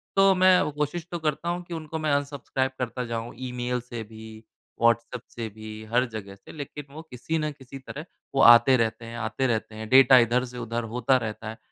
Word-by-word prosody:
तो 195 0 +6
मैं 185 0 +6
वो - - -1
कोशिश 150 +3 -3
तो 175 - -3
करता 155 +1 -2
हूँ 175 +1 -2
कि 175 - -9
उनको 160 -1 -5
मैं 155 -1 0
अनसब्सक्राइब 140 -2 -1
करता 125 0 -3
जाऊँ, 115 0 -5
ईमेल 125 -1 -3
से 120 -1 -7
भी, 110 0 -12 0.4
व्हॉट्सऐप 115 +1 +2
से 115 -1 -5
भी, 110 +1 -9
हर 125 +1 +4
जगह 100 -3 -8
से, 100 - -15
लेकिन 145 -1 -8
वो 155 - -8
किसी 130 +6 -3
ना 155 -1 -1
किसी 135 -2 -11
तरह, 145 +3 -8 0.3
वो 135 - +3
आते 120 +2 +8
रहते 115 0 -1
हैं, 115 +1 -8
आते 120 +4 -1
रहते 110 -2 -2
हैं, 110 0 -6
डेटा 130 +1 +8
इधर 120 +2 +2
से 125 0 -10
उधर 120 0 -3
होता 130 +1 +3
रहता 110 -2 -5
है। 110 - -8
125 Hz, 215 wpm, -26 LUFS, 115-145 Hz, 0.4 s, आते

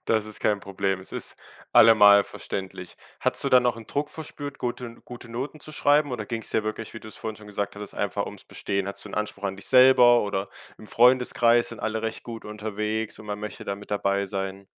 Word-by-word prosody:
Das 110 -1 +1
ist 110 - -8
kein 105 -1 +1
Problem. 95 -1 -2
Es 95 - -13
ist - - -4 0.4
allemal 105 -3 +8
verständlich. 95 -2 -7 0.2
Hattest - - 0
du - - +2
dann 125 -1 +5
auch 120 - +1
'n 115 -1 -11
Druck 145 +1 -2
verspürt, 145 -3 -7
guten 120 -1 -5
gute 120 -1 -10
Noten 130 +6 -5
zu 155 - -10
schreiben 145 0 +3
oder - - -4
ging's 115 -2 -5
dir 110 - 0
wirklich, 110 +1 -5
wie 115 - -7
du's 110 - -11
vorhin 110 -1 -5
schon 105 0 -14
gesagt 100 0 -4
hattest, 105 -1 -8
einfach - - -2
ums - - -10
Bestehen? 100 -1 -3
Hattest 100 - -7
du - - -9
'n - - -6
Anspruch 105 -1 -4
an 95 -1 -2
dich 100 - -7
selber 125 -2 +7
oder 100 -1 -2 0.3
im 110 - -12
Freundeskreis 120 0 +4
sind 115 - -8
alle 110 0 -2
recht 110 0 -3
gut 115 -1 -8
unterwegs 105 +1 -3
und 110 - -12
man 105 0 -4
möchte 105 - -7
da 100 - -2
mit 105 +1 -13
dabei 100 -1 0
sein. 95 0 -5
110 Hz, 225 wpm, -25 LUFS, 100-120 Hz, 0.4 s, allemal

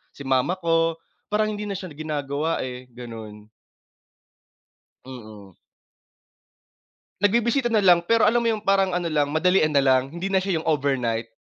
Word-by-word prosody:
si 140 - -10
mama 135 +7 +1
ko 165 -1 +1 0.3
parang 215 +1 +1
hindi 210 0 -5
na 200 - -3
siya 185 -4 -8
ginagawa 150 0 -3
eh 125 0 -8
ganun. 115 -3 -10 1.6
Mm. 110 -7 -12 1.7
Nagbibisita 235 +4 +2
na 215 -4 +2
lang 175 -2 +6
pero 225 +5 +2
alam 240 +2 +3
mo 230 - +1
'yung 215 -1 -3
parang 195 -2 +2
ano 175 - -3
lang 150 -3 0
madalian 160 +1 +2
nalang, 135 -2 +2
hindi 170 +5 -5
na 190 - +3
siya 190 -3 -1
'yung 160 - -6
overnight. 125 -7 -1
160 Hz, 145 wpm, -23 LUFS, 130-195 Hz, 1.7 s, lang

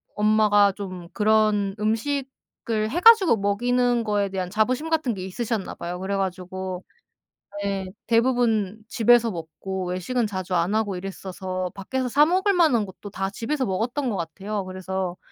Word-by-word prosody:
엄마가 210 -1 +4
좀 185 -4 -7
그런 210 -2 +2
음식을 225 -1 -2
해 350 - -1
가지고 440 - +7
먹이는 240 +4 +1
거에 205 -2 0
대한 185 -2 -3
자부심 250 +9 0
같은 310 -7 +1
게 185 -2 -6
있으셨나 215 +1 -3
봐요. 175 +1 -5
그래 195 +1 -2
가지고 185 -1 -4 0.8
네 195 -1 -2 0.2
대부분 230 -4 +2
집에서 235 -1 +4
먹고 180 +3 -5
외식은 215 +6 -1
자주 185 -2 -4
안 175 +5 +1
하고 205 -4 0
이랬어서 185 -1 -5
밖에서 250 +6 -3
사 295 +4 +5
먹을 380 +3 +2
만한 295 - +3
것도 195 +2 -10
다 195 -1 -3
집에서 260 +5 -2
먹었던 240 +8 -1
것 200 - -2
같아요. 195 +5 -4
그래서 185 -1 -4
205 Hz, 320 characters per minute, -24 LUFS, 190-240 Hz, 0.8 s, 가지고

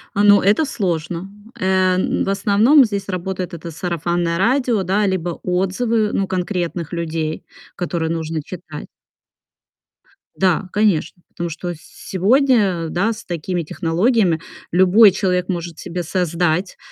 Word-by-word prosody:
А, 205 - +2
ну 205 -1 +6
это 205 +11 +3
сложно. 175 - -3 0.3
Э, 185 0 +2
м, 185 - 0
в - - -2
основном 210 +8 +4
здесь 200 -3 -4
работает 185 0 -4
это 170 0 -7
сарафанное 170 +1 -2
радио, 235 +1 +1
да, 195 +4 +1
либо 180 -3 -2
отзывы, 210 +5 0
ну 195 - +1
конкретных 180 -3 -3
людей, 160 -2 -3 0.3
которые 170 -2 -2
нужно 160 -1 -3
читать. 160 -1 -9 1.5
Да, 185 0 +1
конечно. 195 -5 +1
Потому 170 -1 -5
что 175 +2 -5
с - - -12 0.3
сегодня, 200 - +2
да, 195 +7 0
с 225 - -11
такими 175 +1 -3
технологиями 175 - +1 0.3
любой 190 +4 +6
человек 180 -1 -1
может 170 -2 -4
себе 175 +1 -4
создать, 175 +1 -1
185 Hz, 130 wpm, -19 LUFS, 170-200 Hz, 1.5 s, ну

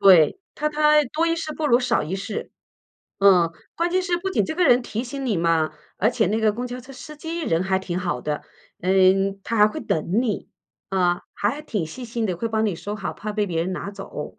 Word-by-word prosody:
对， 190 - +6 0.2
他 300 - 0
他 300 0 +4
多 330 +2 +2
一 330 - +2
事 315 -2 -4
不 310 - -1
如 240 -1 +4
少 250 - +1
一 165 +5 -3
事， 195 +2 -5 0.7
嗯， 180 -4 +6 0.2
关 340 +1 0
键 370 +1 +2
是 355 -1 0
不 385 +2 -3
仅 380 - +1
这 315 - -3
个 360 +2 +2
人 245 -3 +5
提 230 -1 -3
醒 270 +2 -5
你 225 -6 +1
嘛， 165 -2 +2 0.2
而 220 +5 +2
且 230 -5 +1
那 215 +4 +1
个 215 -1 +3
公 245 +3 -4
交 250 +1 -6
车 265 +2 -12
司 305 +3 -10
机 330 +2 -4
人 165 - +1
还 190 0 +1
挺 180 -2 -3
好 180 -1 -2
的， 150 -1 -3 0.4
呃， 185 - 0 0.5
他 230 - -2
还 210 - +7
会 215 - -4
等 170 +8 0
你。 220 -6 -2 0.4
啊， 180 -2 +1
还 235 +9 -1
挺 210 - -2
细 250 +10 -8
心 230 -1 -2
的， 180 - -2
会 230 - -2
帮 220 0 +1
你 200 -6 0
收 205 +4 -5
好， 195 -4 -4
怕 210 +1 -5
被 210 0 +1
别 170 -4 -1
人 185 +3 -1
拿 200 - -4
走。 195 -7 -8
215 Hz, 255 characters per minute, -23 LUFS, 185-280 Hz, 0.7 s, 还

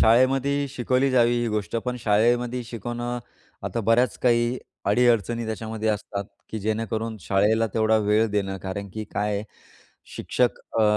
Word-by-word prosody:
शाळेमध्येही 135 +4 +3
शिकवली 130 +1 +1
जावी 120 -1 +3
ही 120 - 0
गोष्ट, 105 -1 -2
पण 125 +2 -2
शाळेमध्ये 120 +4 +2
शिकवणं 120 +1 -4 0.5
आता 115 - -2
बऱ्याच 115 +2 +2
काही 120 0 +2 0.3
अडी-अडचणी 120 -1 +2
त्याच्यामध्ये 110 0 -3
असतात, 100 -1 -2 0.3
की 110 - -3
जेणेकरून 110 +1 -2
शाळेला 105 +4 +2
तेवढा 110 0 +3
वेळ 105 +1 +3
देणं 100 -1 -1
कारण 95 +2 -5
की 110 0 -4
काय 105 0 0
आहे? 100 +1 -2 0.7
शिक्षक 125 -1 0 0.2
अ, - - +5
115 Hz, 140 wpm, -25 LUFS, 105-120 Hz, 0.7 s, अ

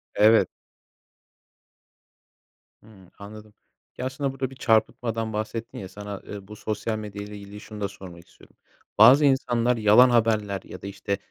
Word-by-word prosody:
Evet. 110 +2 +5 2.4
Hımm. 100 -4 -18
Anladım. 105 +1 -11 0.4
Ya, 125 - -4
aslında 135 +1 -2
burada 135 -1 -4
bir 135 - -13
çarpıtmadan 115 -1 0
bahsettin 110 +2 -5
ya, 95 - -7
sana, 105 -1 -8
eee, 100 -2 -8
bu 105 - -10
sosyal 110 +1 -3
medya 105 -1 -7
ile 105 0 -9
ilgili 100 +1 -11
şunu 105 -1 -10
da 100 - 0
sormak 90 -3 -12
istiyorum. - - -21 0.4
Bazı 130 +8 +8
insanlar 125 -3 +2
yalan 110 +4 +6
haberler 110 -4 +1
ya - - -11
da, 100 - -7
işte, 100 0 -3
110 Hz, 150 wpm, -25 LUFS, 100-115 Hz, 2.4 s, Bazı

